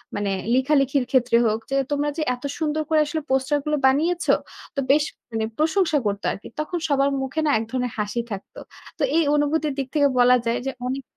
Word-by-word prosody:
মানে 205 -1 -1 0.2
লিখালিখির 275 0 +2
ক্ষেত্রে 250 -3 +3
হোক, 220 0 +1
যে - - +1 0.2
তোমরা 290 0 0
যে - - -1
"এত 245 - -18 0.2
সুন্দর 310 0 0
করে 315 -1 +4
আসলে 310 +1 -3
পোস্টার 265 +2 +1
গুলো 300 0 +1
বানিয়েছ!" 330 +6 +1 0.5
তো 275 - -1
বেশ 290 +1 +4 0.3
মানে 220 -1 -1
প্রশংসা 320 +1 +2
করত 200 -1 -1
আরকি। 200 - -8
তখন 330 +4 -2
সবার 275 -1 +3
মুখে 265 +4 -3
না - - +2
এক - - -2
ধরনের 250 -2 -2
হাসি 210 +3 -1
থাকত। 195 -1 -7 0.4
তো - - -1
এই 330 - +4
অনুভূতির 295 0 +1
দিক 270 -2 -2
থেকে 290 -2 +4
বলা 250 +1 +6
যায় 230 +1 0
যে 270 - -1
অনেক। 265 +1 -3
275 Hz, 200 wpm, -23 LUFS, 250-305 Hz, 0.5 s, বলা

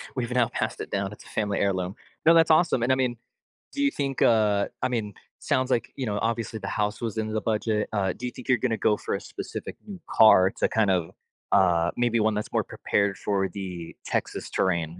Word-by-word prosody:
"We've 125 -2 -2
now 125 -2 +2
passed - - -3
it - - -7
down; 100 0 -1
it's 105 - -12
a - - -17
family 105 -2 -1
heirloom." 95 0 0 0.3
No, 165 - +8
that's 165 -1 +5
awesome. 155 -6 +3
And 125 - +2
I 130 - +5
mean, 125 -2 0 0.6
do 285 - -2
you 280 - +3
think, 135 -2 -3
uh 105 -3 +3
I 130 - +1
mean, 110 -4 -2 0.3
sounds 130 0 0
like, 115 -1 0
you 135 - -3
know, 105 -2 -2
obviously 115 -1 -2
the 100 - -6
house 105 0 -2
was 115 -2 -3
in 110 0 -2
the 110 - 0
budget. 110 -1 -1
Uh, 95 -3 0
do 125 - -7
you 125 - -3
think 125 - -12
you're 125 - +5
gonna 115 -1 -1
go 105 0 +2
for - - -3
a - - -4
specific - - -7
new 195 -4 -8
car 95 -4 +6
to - - +3
kind 110 -3 +2
of, 90 -3 0 0.4
uh, 85 -3 +3
maybe 120 -1 +2
one 110 0 +2
that's 105 0 -4
more - - +2
prepared 100 -1 -1
for 100 -2 0
the 90 -4 -7
Texas - - -3
terrain, 85 -3 -1
110 Hz, 230 wpm, -26 LUFS, 100-125 Hz, 0.6 s, No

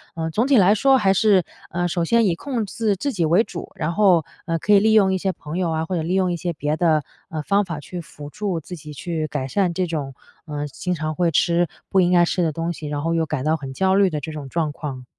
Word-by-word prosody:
呃， 160 -1 -2
总 225 +10 +1
体 275 -2 +5
来 200 0 +6
说 270 +5 +4
还 195 -5 +3
是， 195 -2 +4 0.3
呃， 175 0 -1
首 170 0 -1
先 230 +5 +3
以 180 -4 +2
控 240 +3 -3
制 210 +1 -1
自 280 +9 -2
己 175 -5 0
为 175 +8 +4
主， 175 -7 -8
然 165 +2 -2
后， 180 -5 +4 0.2
呃， 165 -1 -1
可 210 - +2
以 200 - +8
利 220 +2 +3
用 195 -3 +5
一 - - +1
些 190 +1 -1
朋 155 -2 -7
友 180 -2 0
啊， 160 0 -1
或 185 - -3
者 170 - -1
利 165 +3 -2
用 185 -2 +2
一 175 - -2
些 175 +1 -3
别 150 0 -2
的， 160 -3 +2 0.3
呃， 155 -1 -4
方 200 +6 +1
法 165 -4 -5
去 175 +4 -7
辅 150 -2 -11
助 195 0 -3
自 180 +3 -9
己 150 -2 -10
去 160 +1 -3
改 140 -3 -3
善 180 +4 0
这 185 +2 0
种， 145 -5 -4 0.3
呃， 150 -2 -4
经 180 +5 -3
常 155 -1 -3
会 175 0 +1
吃 170 +2 +2 0.2
不 195 - +3
应 175 0 +2
该 175 -1 +5
吃 180 - -1
的 160 - +1
东 165 +3 -3
西， 155 -2 -7
然 145 0 -3
后 165 +2 -1
又 165 -1 +1
感 155 -4 -3
到 155 +2 +1
很 135 -3 -7
焦 190 +6 +2
虑 195 -1 +4
的 155 -3 -3
这 160 +2 -6
种 150 -3 -7
状 160 0 -1
况。 135 -4 -7
170 Hz, 295 characters per minute, -22 LUFS, 155-190 Hz, 0.3 s, 以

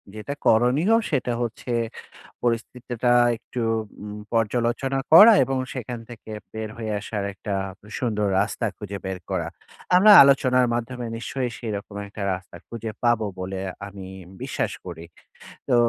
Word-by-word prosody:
যেটা 110 +7 -5
করণীয় 125 - +4 0.2
সেটা 125 -4 0
হচ্ছে 120 +1 -4 0.7
পরিস্থিতিটা 120 +1 -1 0.3
একটু 125 - -6 0.4
উম 105 0 -7 0.2
পর্যালোচনা 120 +4 0
করা 210 +7 +11
এবং 135 +1 -1 0.2
সেখান 125 -2 -5
থেকে 110 -2 -10 0.2
বের 110 0 -4
হয়ে 110 -2 -4
আসার 105 -1 -4
একটা 100 +1 -5 0.5
সুন্দর 105 -4 0
রাস্তা 110 +3 -1
খুঁজে 100 -1 -6
বের 95 -1 -3
করা। - - -1 0.5
আমরা 210 +4 +8
আলোচনার 130 -2 +4
মাধ্যমে 120 +1 -3
নিশ্চয়ই 125 +1 -3
সেরকম 105 -2 -5
একটা 100 0 -9
রাস্তা 90 0 -8
খুঁজে 115 -1 -5
পাবো 120 -2 +3
বলে 95 +1 -4 0.3
আমি 100 -2 -9 0.3
বিশ্বাস - - -2
করি। 85 -2 -8 0.6
তো - - +3
115 Hz, 130 wpm, -24 LUFS, 105-125 Hz, 0.7 s, করা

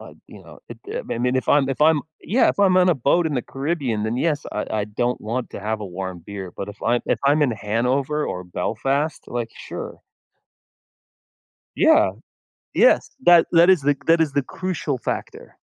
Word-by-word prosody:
Uh, - - -12
you - - -13
know? - - -14
It, - - -10
eh 475 +3 -3
I - - -3
mean, 125 +1 +1
if 130 - -2
I'm 140 -2 +4
if 135 +1 -3
I'm 155 -1 +5 0.2
Yeah, 235 +8 +2
if - - -1
I'm 190 -2 +4
on 185 0 +5
a 175 - +4
boat 140 +7 +2
in 150 - -2
the 125 - -1
Caribbean, 135 -6 -2
then, 115 +2 -2
yes, 150 +1 -1
I 105 - -3
I 105 -2 -1
don't 120 +4 -2
want 120 +3 -4
to - - -8
have 110 +1 -3
a 105 - -5
warm 95 -1 -6
beer. 100 -3 -7
But 100 - -5
if 105 - -11
I'm 120 +1 +1
if - - +1
I'm 145 +2 +4
in 135 - +2
Hanover 125 +7 -1
or 90 0 -5
Belfast, 135 - -2
like, 120 -2 -4
sure. - - -8 1.8
Yeah. 320 +1 +5 0.6
Yes. - - +4
That 175 -1 +7
that 170 +1 +6
is 175 -7 +4
the 145 0 +2
that 165 0 +4
is 150 -4 +1
the 145 - +1
crucial 160 -4 -4
factor. - - -6
135 Hz, 205 wpm, -22 LUFS, 110-160 Hz, 1.8 s, That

